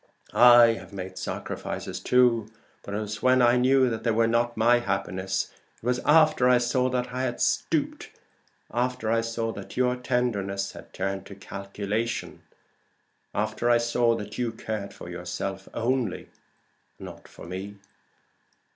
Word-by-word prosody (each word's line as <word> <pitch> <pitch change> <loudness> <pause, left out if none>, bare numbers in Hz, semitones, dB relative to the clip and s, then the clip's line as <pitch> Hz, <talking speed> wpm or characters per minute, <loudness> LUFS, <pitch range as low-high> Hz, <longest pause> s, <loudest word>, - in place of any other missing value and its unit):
I 120 -1 +8
have - - -13
made 95 -1 -7
sacrifices - - -5
too, 120 -4 +3 0.3
but 100 - -6
it - - -1
was 105 0 -5
when 130 0 +4
I 120 0 +5
knew 130 +1 +4
that 115 -2 -3
they 120 - +1
were 115 +1 +3
not 120 +1 +1
my 120 +2 +4
happiness. 95 -3 -2 0.3
It - - -17
was 125 0 +1
after 155 -4 +5
I 125 - +6
saw 125 +1 +1
that 125 -1 -2
I 130 - -2
had 130 -2 -2
stooped - - 0 0.6
after 125 -1 -1
I 115 0 +3
saw 115 0 -2
that 100 +1 -9
your 125 0 +2
tenderness 105 -6 -1
had - - -13
turned 95 +1 -4
into 100 - -9
calculation 100 +3 -4 0.9
after 110 +3 0
I 120 - +6
saw 120 0 +2
that 105 0 -7
you 120 -2 -1
cared 110 -3 -5
for - - -11
yourself 90 +2 -5
only, 120 -3 -1 0.7
and - - -9
not - - -11
for - - -12
me. 95 +4 -6
115 Hz, 155 wpm, -26 LUFS, 100-125 Hz, 0.9 s, I